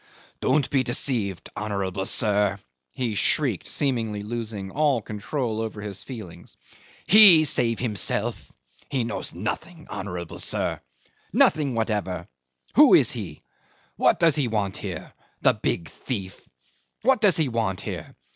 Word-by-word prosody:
"Don't 135 0 +2
be 135 - +3
deceived, 120 - -2
honourable 100 -2 -3
sir!" 105 -3 +1 0.4
he 120 -4 -2
shrieked, 120 - +1
seemingly 115 -7 -1
losing 105 -3 -5
all 145 -2 +2
control 110 +2 -3
over 110 -1 -5
his 100 -2 -6
feelings. 100 -9 -10 0.5
"He 190 -6 +9
save 115 -5 0
himself! 110 -6 -2 0.4
He 135 -4 0
knows 115 - -4
nothing, 170 -2 -5
honourable 90 -5 -6
sir - - -1 0.5
nothing 145 -5 +3
whatever. 100 -6 -2 0.5
Who - - +8
is - - +4
he? 95 -11 -7 0.5
What - - +3
does 165 -4 +4
he 145 -4 +1
want 105 -4 -1
here - - -6 0.3
the - - +5
big 85 - -2
thief? 95 -8 -6 0.5
What 255 -1 +3
does 205 -5 +4
he 160 -3 +2
want 115 -6 -1
here? - - -7
110 Hz, 130 wpm, -25 LUFS, 100-135 Hz, 0.5 s, He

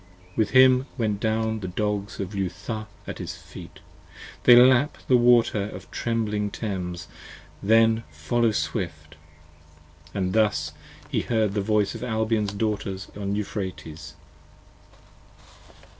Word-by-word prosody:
With 110 -2 +1
him 130 0 +6
went 105 -4 0
down 110 0 0
the 95 - -5
Dogs 100 +2 -2
of 95 +1 -4
Leutha 100 +3 -4 0.2
at - - -7
his - - -5
feet, - - -12 0.6
They 120 - +9
lap 130 +3 +5
the 130 - +5
water 120 -4 +4
of - - -9
the - - -23
trembling 105 -3 -1
Thames, 90 -5 -4 0.5
then 115 +2 +4
follow 85 +10 0
swift. 80 -8 -3 1.0
And 95 -1 -2
thus 100 -9 +1 0.4
he - - 0
heard 110 -4 0
the 100 - 0
voice 105 0 +1
of - - -7
Albion's 110 -3 0
daughters 100 -3 -3
on 100 0 -2
Euphrates. 85 -7 -5
105 Hz, 125 wpm, -25 LUFS, 95-115 Hz, 1.0 s, They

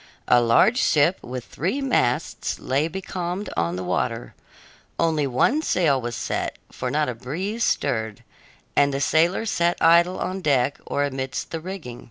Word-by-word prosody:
A 120 -1 +5
large 120 - +4
ship 155 - +3
with 125 0 -6
three 190 - -2
masts 250 - 0
lay 140 +4 0
becalmed 180 +2 -4
on 85 +1 0
the 90 - -4
water; 90 -9 -2 0.6
only 160 -4 +1
one 135 - +2
sail 155 - +2
was 120 0 -4
set, - - -3 0.2
for 125 - -4
not 150 +3 +1
a 125 - -2
breeze 180 - -4
stirred, 110 - -1 0.5
and 140 0 +4
the 135 - -2
sailors 170 +9 +2
sat 170 0 +1
idle 170 +3 +5
on 185 +1 -3
deck 140 -4 +1
or 145 - 0
amidst 135 -1 -3
the 165 - -3
rigging. 160 -9 -7
145 Hz, 160 wpm, -23 LUFS, 125-180 Hz, 0.6 s, A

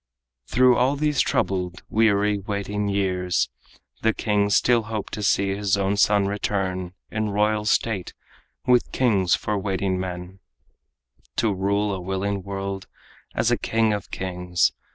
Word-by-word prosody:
Through 125 - +4
all 130 +3 +3
these 150 -1 +1
troubled, 90 -2 -1
weary, 105 -2 +2
waiting 100 +1 -3
years, 90 -5 0 0.5
The 110 0 +2
king 105 -2 +1
still 120 +3 +4
hoped 110 -3 -4
to 105 - -3
see 100 0 +2
his 100 0 +1 0.2
son 100 -1 +4
return 95 -2 -2 0.2
In 110 -1 -1
royal 105 +1 +1
state, 105 -3 0 0.5
with 125 -1 +3
kings 100 -9 +3
for 105 -1 -2
waiting 95 -1 -1
men, 90 +1 -6 1.0
To 110 -3 +1
rule 100 +2 0
a 95 - -4
willing 95 +2 -2
world 95 0 -5 0.5
as - - +2
king 115 -1 +2
of 105 -2 -4
kings. 90 -1 0
100 Hz, 130 wpm, -24 LUFS, 95-105 Hz, 1.0 s, Through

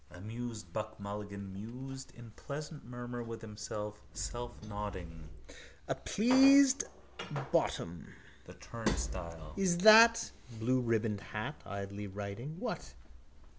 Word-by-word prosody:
Amused 110 -1 -7
Buck 110 0 -4
Mulligan 100 -1 -6
mused 130 +6 -7
in 120 -2 -11
pleasant 150 +6 -7
murmur 120 0 -6
with 115 -1 -6
himself, 105 -1 -5
selfnodding: 105 -8 -5 0.6
—A - - +1
pleased 270 +4 +6 0.7
bottom. 85 0 0 0.4
The - - -12
turnstile. 85 -4 -3
Is 185 -3 +2
that?... 225 +4 +8 0.3
Blueribboned 115 -3 +1
hat... 110 +9 -5
Idly 100 +1 -5
writing... 105 - -6
What? 245 - -4
110 Hz, 95 wpm, -34 LUFS, 100-135 Hz, 0.7 s, that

